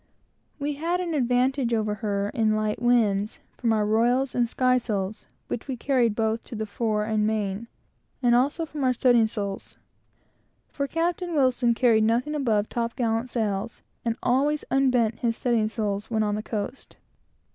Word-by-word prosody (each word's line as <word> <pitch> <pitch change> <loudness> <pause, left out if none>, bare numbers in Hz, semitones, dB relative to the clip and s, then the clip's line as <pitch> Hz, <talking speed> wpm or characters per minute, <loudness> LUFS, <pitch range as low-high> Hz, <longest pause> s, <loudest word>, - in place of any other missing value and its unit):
We 290 0 -2
had 345 +2 0
an 350 -2 -2
advantage 250 -2 +1
over 215 -1 0
her 200 -2 -1
in 215 -1 +2
light 215 +1 -1
winds, 215 -4 +2 0.2
from 235 -2 0
our 215 -1 +2
royals 240 +5 +2
and 240 -1 +1
skysails 230 -6 0 0.2
which 240 - -5
we 260 -2 -3
carried 240 -4 +1
both 225 0 -1
at 230 - -5
the 220 - -2
fore 215 0 -1
and 215 -1 +1
main, 215 0 -2 0.5
and 245 -2 +3
also 285 +7 +2
in 295 -2 -3
our 255 -1 +3
studding 240 -2 +4
sails; 200 -3 -5 0.9
for 280 -1 -2
Captain 340 +2 -1
Wilson 250 -4 +3
carried 230 -3 +4
nothing 235 +7 +1
above 225 -8 +1
top 235 -1 -3
gallant 230 0 -1
sails, 215 -2 -2 0.2
and 230 -1 -1
always 285 +4 +1
unbent 250 -4 +2
his 230 -1 0
studding 235 -3 +1
sails 210 -2 -3
when 220 -2 +1
on 210 -1 0
the 210 - -2
coast. 215 +4 -5
235 Hz, 165 wpm, -25 LUFS, 215-255 Hz, 0.9 s, studding